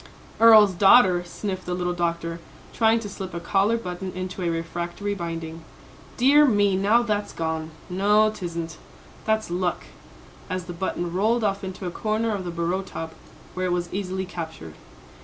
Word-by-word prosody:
"Earl's 215 -3 +8
daughter," 185 -1 +6
sniffed 185 +1 -5
the 180 - -1
little 180 0 -1
doctor, 170 -1 -2 0.3
trying 225 0 +3
to 210 - -6
slip 190 -3 -7
a - - -2
collar 195 +6 +2
button 185 -3 -5
into 185 0 -5
a 175 - 0
refractory 175 +4 -3
binding. 165 -3 -5 0.5
"Dear 280 +4 +6
me, 205 -5 +3
now 210 +5 +3
that's 210 -3 -1
gone 160 -1 -3 0.2
no, 210 +4 +3
'tisn't 170 -5 -5 0.5
that's 220 -4 0
luck," 180 0 -1 0.7
as 185 -1 -3
the 175 - -7
button 175 -1 -3
rolled 220 +5 +1
off 200 -1 0
into 190 0 -6
a 175 - -3
corner 215 +3 -1
of 195 -3 -4
the - - -3
bureau 170 +2 -1
top 165 -4 -7 0.4
where 185 0 -2
it - - -1
was 175 -1 -2
easily 190 -1 -3
captured. 160 - -7
185 Hz, 165 wpm, -24 LUFS, 170-205 Hz, 0.7 s, Earl's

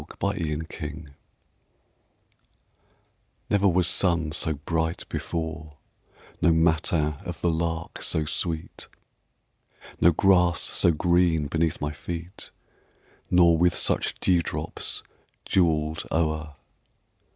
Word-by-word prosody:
A - - -10
SUMMER 100 0 0
MORNING 75 -3 -5 2.4
Never 100 -1 +3
was 90 -1 +2
sun 85 -4 +1
so 80 0 0
bright 80 +3 -2
before, 80 -2 -5 0.6
No 85 - +5
matin 80 -2 +1
of 85 -2 -6
the 85 - +2
lark 80 0 -3
so 80 - 0
sweet, 80 +1 -3 1.1
No 85 - +6
grass 90 0 +3
so - - +2
green 85 -1 +2
beneath 80 +2 0
my 75 0 -2
feet, 85 +4 -7 0.8
Nor 85 -2 +5
with 90 -1 +3
such - - 0
dewdrops 85 -2 -1 0.4
jewelled 80 -4 +1
o'er. 80 -2 -1
80 Hz, 100 wpm, -26 LUFS, 80-85 Hz, 2.4 s, No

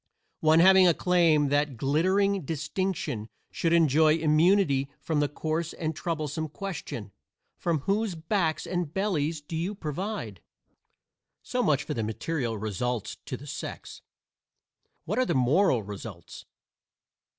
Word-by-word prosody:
One 160 +1 +5
having 190 0 +7
a 170 - +4
claim 170 -4 +3
to 140 - 0
that 145 -3 +1
glittering 185 - +2
distinction 150 - -3 0.2
should 165 - 0
enjoy 160 -1 +5
immunity 155 -2 +3
from 160 -2 -1
the 145 -1 +1
coarse 160 +2 -3
and 160 -1 -3
troublesome 155 -1 -3
question, 150 - -6 0.5
"From 165 -4 0
whose 200 +3 0
backs 165 0 -1
and 175 -4 -2
bellies 165 -5 -1
do 150 +3 -7
you 175 +6 -2
provide?" 160 - -5 1.0
So 250 - -1
much 150 - +2
for - - -4
the 115 - -2
material 115 +2 -2
results 110 +2 -3
to - - -4
the - - -12
sex. - - -7 1.0
What 210 +8 -1
are 255 - +3
the 170 - 0
moral 130 - +3
results? 100 -3 -9
160 Hz, 135 wpm, -27 LUFS, 140-180 Hz, 1.0 s, having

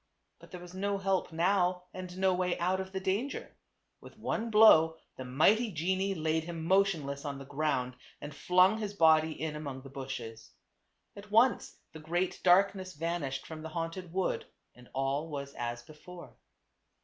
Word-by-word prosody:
But - - -16
there 180 - -8
was 175 0 -12
no 200 +2 -1
help 195 -2 -1
now, 180 +1 +1
and 185 -1 -8
no 190 0 +3
way 180 -1 0
out 185 +2 0
of 190 0 -5
the 190 - -3
danger. 200 +9 -3 0.4
With - - -15
one 230 +1 -2
blow 165 -7 +6 0.2
the 130 - -7
mighty 200 - +3
genie 190 +4 -1
laid 160 -1 -1
hiin 165 -1 -6
motion 190 -3 +2
less 140 +1 -5
on 140 -2 -4
the 135 - -9
ground 135 -3 -1 0.3
and 145 0 -8
flung 180 +7 +3
his 205 -2 -4
body 160 -3 +4
in 155 -1 -3
among 140 -4 -6
the 135 - -11
bushes. 125 -5 -7 0.6
At 200 +1 -11
once 230 +4 +3 0.2
the 160 - -9
great 175 +4 -2
darkness 185 0 +3
vanished 155 -4 -3
from 160 -1 -8
the 160 - -7
haunted 165 +2 -5
wood 185 +1 -1 0.3
and 125 0 -17
all 135 +4 -1
was 140 -2 -6
as 120 0 -5
before. 165 +5 -13
170 Hz, 175 wpm, -31 LUFS, 150-190 Hz, 0.6 s, blow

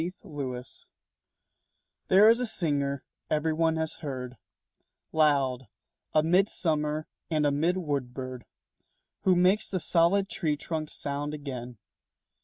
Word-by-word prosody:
THE 175 +3 -3
OVEN 145 -8 -5
BIRD 125 0 -6 1.4
There 200 +3 +7
is 230 +2 +6
a 250 - 0
singer 140 -8 0 0.3
everyone 160 +1 +1
has 160 -1 0
heard, 130 -4 -5 0.8
Loud, 135 -5 +2 0.4
a 155 - +3
mid 185 +5 +3
summer 155 -2 0 0.2
and 155 -2 +1
a 145 - +3
mid 165 +6 +1
wood 145 -8 -2
bird, 130 -1 -7 0.8
Who 185 - +5
makes 185 +4 +3
the 185 - -1
solid 175 +4 +3
tree 160 -8 -1
trunks 155 0 -4
sound 145 +1 -3
again. 125 -5 -7
155 Hz, 130 wpm, -28 LUFS, 140-175 Hz, 1.4 s, There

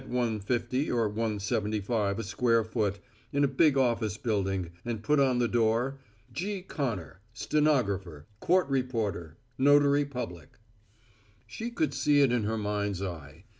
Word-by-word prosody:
50 125 +2 -1
or 115 -2 +1
$1.75 105 -1 -1
a 115 - -3
square 115 +2 +2
foot, 105 -2 -1 0.3
in 140 +1 +1
a - - +5
big 140 +1 +3
office 115 -5 +1
building 95 -6 -1
and 115 -2 -4
put 150 0 +3
on 130 -3 +3
the 120 -1 +2
door 120 +4 +1 0.3
G. 195 +2 -3
CONNOR 115 - -4 0.2
STENOGRAPHER 100 - 0
COURT 180 - +2
REPORTER 115 - -2 0.2
NOTARY 145 +1 +5
PUBLIC 120 - -7 0.9
She 230 +2 -5
could 155 - -1
see 145 +1 +3
it 135 -3 +4
in 120 -3 +1
her 110 +1 -1
mind's 105 -2 -2
eye. 80 -3 -7
115 Hz, 135 wpm, -29 LUFS, 100-135 Hz, 0.9 s, a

